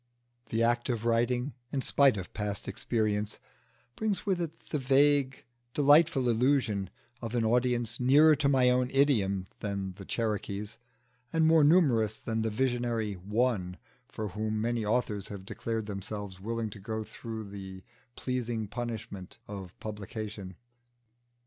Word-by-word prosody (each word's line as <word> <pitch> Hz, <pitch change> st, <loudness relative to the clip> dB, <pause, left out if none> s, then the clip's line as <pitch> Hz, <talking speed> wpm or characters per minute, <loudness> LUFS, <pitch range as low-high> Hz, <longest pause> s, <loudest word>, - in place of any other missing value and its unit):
The 115 Hz, +1 st, +1 dB
act 120 Hz, +1 st, +1 dB
of 115 Hz, -2 st, -1 dB
writing, 120 Hz, +3 st, +1 dB, 0.2 s
in 135 Hz, -2 st, -1 dB
spite 140 Hz, -5 st, +4 dB
of 90 Hz, -2 st, -7 dB
past 105 Hz, -1 st, -3 dB
experience, 105 Hz, -2 st, -1 dB, 0.6 s
brings 215 Hz, -3 st, -1 dB
with 190 Hz, -3 st, +1 dB
it 165 Hz, -2 st, -3 dB, 0.2 s
the 150 Hz, -, 0 dB
vague, 135 Hz, 0 st, +3 dB, 0.3 s
delightful 145 Hz, -2 st, +5 dB
illusion 120 Hz, -5 st, +2 dB, 0.3 s
of 115 Hz, 0 st, -4 dB
an 115 Hz, -2 st, +2 dB
audience 120 Hz, 0 st, +2 dB
nearer 145 Hz, +5 st, +6 dB
to 140 Hz, -1 st, +2 dB
my 135 Hz, -2 st, +4 dB
idiom 125 Hz, -6 st, +3 dB
than 100 Hz, -2 st, -3 dB
the 100 Hz, -, -9 dB
Cherokees, 105 Hz, -2 st, -3 dB, 0.5 s
and 160 Hz, -1 st, +3 dB
more 160 Hz, -1 st, +6 dB
numerous 130 Hz, -, +4 dB
than 115 Hz, -1 st, -2 dB
the 110 Hz, -, 0 dB
visionary 120 Hz, -2 st, 0 dB
One 100 Hz, -1 st, -1 dB, 0.3 s
for 110 Hz, -2 st, -5 dB
whom 110 Hz, +2 st, -2 dB
many 115 Hz, +1 st, 0 dB
authors 105 Hz, -2 st, 0 dB
have 100 Hz, -2 st, -8 dB
declared 110 Hz, +2 st, -3 dB
themselves 100 Hz, -1 st, -6 dB
willing 115 Hz, +1 st, -3 dB
to 100 Hz, -, -10 dB
go 110 Hz, +2 st, -4 dB
through 110 Hz, -1 st, -7 dB
the 95 Hz, -1 st, -8 dB, 0.3 s
pleasing 120 Hz, -4 st, -2 dB
punishment 110 Hz, -5 st, -6 dB
of 95 Hz, -3 st, -8 dB
publication. 105 Hz, -2 st, -6 dB
115 Hz, 135 wpm, -30 LUFS, 105-125 Hz, 0.6 s, nearer